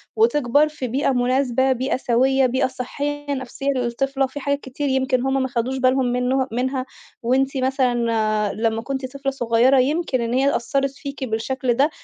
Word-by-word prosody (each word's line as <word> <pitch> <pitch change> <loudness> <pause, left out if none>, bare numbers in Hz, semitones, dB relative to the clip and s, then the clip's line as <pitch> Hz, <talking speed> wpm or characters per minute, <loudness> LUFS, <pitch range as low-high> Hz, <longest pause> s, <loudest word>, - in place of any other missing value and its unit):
وتكبَر 295 - +3
في 285 -4 -5
بيئة 270 +4 0
مناسبة، 255 +1 +1
بيئة 260 +1 0
سويّة، 260 +2 +2
بيئة 260 +1 +1
صحيّة 285 +3 -4
نفسية 265 +1 -5
للطفلة 270 +2 -1
وفي 265 +2 -7
حاجات 280 +1 -1
كتير 275 +2 -4
يمكن 260 -1 +1
هُم 270 +1 0
ما 260 - 0
خدوش 250 +1 -2
بالهم 260 0 +2
منُّه 250 +2 0
منها 255 +2 -1 0.4
وأنتِ 270 +3 +1
مثلًا 260 -1 +1 0.6
لمّا 225 0 -1
كُنتِ 265 +1 -4
طفلة 275 0 -1
صغيرة 245 +1 +3
يمكن 280 -1 0
إن 235 0 -2
هي 270 +2 +2
أثّرِت 275 +3 0
فيكِ 280 -2 -7
بالشكل 250 +2 -1
ده 275 +5 +3
260 Hz, 165 wpm, -22 LUFS, 250-275 Hz, 0.6 s, وتكبَر